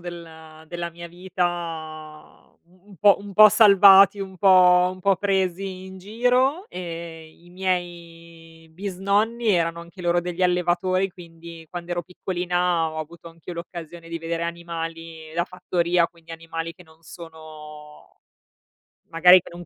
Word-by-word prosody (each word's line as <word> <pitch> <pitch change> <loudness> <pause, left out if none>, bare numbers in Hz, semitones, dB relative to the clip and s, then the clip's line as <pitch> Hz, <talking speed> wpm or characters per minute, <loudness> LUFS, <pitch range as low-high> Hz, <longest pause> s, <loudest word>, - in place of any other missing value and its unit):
della 160 -2 -11
della 170 0 -5
mia 170 0 -10
vita, 165 -4 -6
uhm, 180 +2 -27
un 200 - -15
po' 200 +2 +5
un 200 0 -10
po' 215 +2 +8
salvati, 200 -1 +6
un 190 -1 -7
po' 180 -1 +5
un 185 - -12
po' 195 +1 +2
presi 190 -1 -2
in 190 0 -11
giro 250 - 0
e 165 -2 -8
i 175 - -19
miei 170 -3 -6
bisnonni 200 +6 -1
erano 170 -3 +1
anche 170 +2 -13
loro 175 0 +1
degli 180 +1 -5
allevatori, 180 +1 +1
quindi 165 -2 -13
quando 175 0 -6
ero 175 - -2
piccolina 180 -1 -2
ho 155 - -7
avuto 170 +2 -9
anch'io 165 +1 -11
l'occasione 170 0 -9
di 165 - -4
vedere 165 0 -4
animali 165 -1 -7
da 170 - 0
fattoria, 175 -1 0
quindi 165 -1 -15
animali 165 0 -6
che 180 - -16
non 160 -1 -23
sono 155 -2 -13 0.9
magari 180 +2 +6
che - - -13
non 175 0 -10
175 Hz, 145 wpm, -23 LUFS, 165-185 Hz, 0.9 s, po